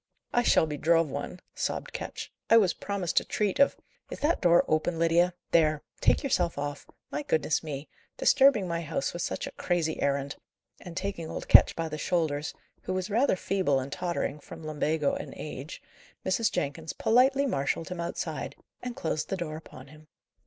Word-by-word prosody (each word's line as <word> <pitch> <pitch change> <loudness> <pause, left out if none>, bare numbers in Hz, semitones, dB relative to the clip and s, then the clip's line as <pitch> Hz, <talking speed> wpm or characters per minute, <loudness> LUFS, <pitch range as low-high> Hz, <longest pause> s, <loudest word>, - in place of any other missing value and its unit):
"I 240 - +4
shall 225 - +4
be 150 -2 -4
drove 165 0 +3
one," 145 +6 -5
sobbed - - -3
Ketch. - - -6 0.2
"I 230 - +8
was 195 -5 +4
promised 195 -4 0
a - - -8
treat 205 -3 -1
of 280 - +5 0.2
" - - -40
"Is - - -6
that 310 +3 +2
door 175 -1 +5
open, 155 +2 +1
Lydia? 170 +2 +3 0.2
There! 155 -3 +3 0.2
Take - - +3
yourself 180 - +1
off. 145 0 -4 0.2
My 145 - -2
goodness, 155 0 +1
me! 150 -2 -6 0.3
disturbing 265 -8 +5
my 170 -1 -2
house 160 -1 -2
with 175 - -4
such - - -2
a - - -6
crazy 165 -3 -1
errand!" 140 0 0 0.4
And, 175 -1 -9
taking 190 -4 -3
old - - -6
Ketch - - +7
by 165 -1 -2
the 155 -1 -5
shoulders, 155 -4 -1 0.3
who 185 - -3
was 185 +2 -3
rather 235 +1 +3
feeble 185 -7 +1
and 130 +1 -5
tottering, 170 -5 -2
from 160 +2 -11
lumbago 150 -1 0
and - - -6
age, 150 0 -7 0.4
Mrs. 190 +4 +2
Jenkins 155 +3 -3
politely 265 +4 +3
marshalled 160 - -1
him 180 -1 -5
outside, 170 0 -4 0.3
and 245 -1 -5
closed 160 -2 -2
the 195 - -1
door 160 -3 -4
upon 135 -4 -11
him. 155 +1 -16
165 Hz, 185 wpm, -28 LUFS, 150-185 Hz, 0.4 s, I